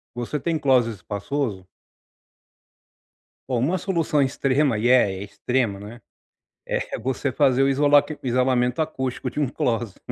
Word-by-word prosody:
Você 120 +5 -3
tem 165 +3 -1
closet 130 -5 +3
espaçoso? 105 0 -4 1.8
Ó 130 -2 -1
uma 155 +10 +1
solução 165 -5 0
extrema, 135 -1 +1
e 110 +3 0
é 100 -7 +3
extrema, 110 +1 -1
né, 110 +4 -10 0.7
é - - -2
você 130 +1 -2
fazer 135 0 +3
o 135 - +3
isolame 145 +1 +4 0.2
o - - -5
isolamento 125 +1 +1
acústico 130 -5 -3
de 145 - -4
um 145 - +1
closet. 115 -4 -2
130 Hz, 135 wpm, -23 LUFS, 120-145 Hz, 1.8 s, isolame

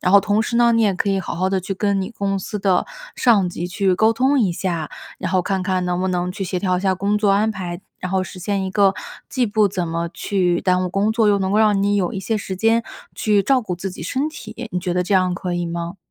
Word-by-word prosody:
然 180 - +1
后 200 - +8
同 210 +2 +1
时 235 - -2
呢， 235 -1 +5
你 230 0 +3
也 205 -2 +3
可 195 +2 -1
以 195 -1 +1
好 180 - -4
好 185 +2 0
地 190 0 +1
去 185 +2 -4
跟 200 0 0
你 190 - -5
公 200 -3 -2
司 205 +2 -5
的 190 -2 +2 0.3
上 210 -7 +4
级 175 0 -4
去 185 +1 +1
沟 220 +4 +3
通 265 +4 +2
一 200 -8 +2
下， 170 -4 -3 0.3
然 185 0 -3
后 185 - +3
看 190 0 -1
看 185 -1 0
能 180 0 -1
不 190 - 0
能 180 0 -1
去 195 +1 -4
协 180 0 -2
调 185 -1 0
一 - - -2
下 190 -1 +1
工 200 +3 0
作 210 -1 +2
安 210 +3 +3
排， 180 -4 -5 0.2
然 185 0 -5
后 190 -1 +2
实 185 - -8
现 195 +1 -1
一 190 - -3
个 195 -1 +3 0.4
既 255 -3 +1
不 210 0 +3
怎 180 -3 -2
么 170 +1 -2
去 180 -4 0
耽 185 0 +2
误 - - -1
工 200 +3 +1
作， 220 -1 +2
又 200 - +3
能 190 -1 -1
够 210 - +2
让 210 -2 +3
你 205 0 +2
有 180 -3 0
一 195 - -4
些 220 +4 -1
时 195 -2 -4
间 225 +4 +2 0.3
去 205 -2 +2
照 265 +2 +3
顾 180 -4 -3
自 190 +2 -5
己 180 - -9
身 265 - -1
体， 245 -6 -8
你 180 - -1
觉 180 0 -2
得 180 0 +1
这 195 +2 0
样 185 -1 +3
可 180 -1 -3
以 175 0 -1
吗？ 170 +2 -4
195 Hz, 300 characters per minute, -21 LUFS, 180-210 Hz, 0.4 s, 后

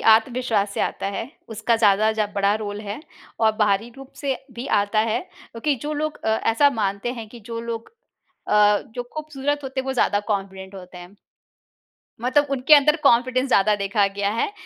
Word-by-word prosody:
आत्मविश्वास 225 -2 +2
से - - -2
आता - - -2
है, 230 +5 -5 0.2
उसका 225 +1 0
ज़्यादा 215 -1 +4
जब 210 -2 -2
बड़ा 200 0 +2
रोल 210 -1 -4
है 210 +4 -6 0.4
और 220 -1 +4
बाहरी 210 +1 +1
रूप 270 -1 -12
से 275 -3 -1 0.2
भी 240 +3 -6
आता 205 +2 -1
है, 225 +2 0
क्योंकि 275 +5 -4
जो 300 - -3
लोग 305 0 -3
अ, - - 0
ऐसा 225 +6 +3
मानते 210 0 -2
हैं 230 -3 -8
कि 235 +2 -12
जो 230 0 -3
लोग 230 -1 -5 0.6
अ, 210 -1 +4
जो 245 - -3
खूबसूरत 290 -2 -3
होते 265 0 -3
हैं, 265 - -8
वो 265 - -1
ज़्यादा 205 -5 +2
कॉन्फिडेंट 195 -1 -5
होते 180 -1 -11
हैं। 180 +3 -13 1.0
मतलब 285 +4 +2
उनके 275 +2 +5
अंदर 300 +2 +5
कॉन्फिडेंस 255 +1 +3
ज़्यादा 210 -2 +4
देखा 200 +1 +1
गया 200 0 0
है, 230 - -1
225 Hz, 185 wpm, -23 LUFS, 205-260 Hz, 1.0 s, उनके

